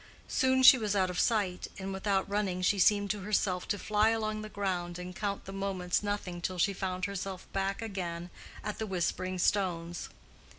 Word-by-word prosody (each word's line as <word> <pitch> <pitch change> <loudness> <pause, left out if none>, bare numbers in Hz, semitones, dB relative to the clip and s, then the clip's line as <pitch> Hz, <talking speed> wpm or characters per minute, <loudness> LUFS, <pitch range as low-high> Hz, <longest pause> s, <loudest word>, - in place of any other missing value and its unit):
Soon 260 0 +2
she 260 0 +10
was 210 -2 0
out 185 -2 +2
of 180 - -3
sight, 200 -6 +1
and 195 0 -4
without 195 0 0
running 200 -3 -1
she 200 +2 +3
seemed 205 +1 +4
to 210 - -3
herself 190 -2 0
to 205 - 0
fly 215 +1 +2
along 215 -1 -1
the 215 - -7
ground 180 -4 -2
and 180 0 -7
count 200 -1 -3
the 195 - -7
moments 190 -2 -1
nothing 205 -4 -3
till 185 +1 -2
she 195 +3 +2
found 185 -1 -2
herself 195 -1 -5
back 195 +2 -1
again 175 -5 -4 0.3
at 210 -1 -4
the 220 - -2
Whispering 185 0 -1
Stones. 175 -3 0
195 Hz, 185 wpm, -31 LUFS, 180-205 Hz, 0.3 s, she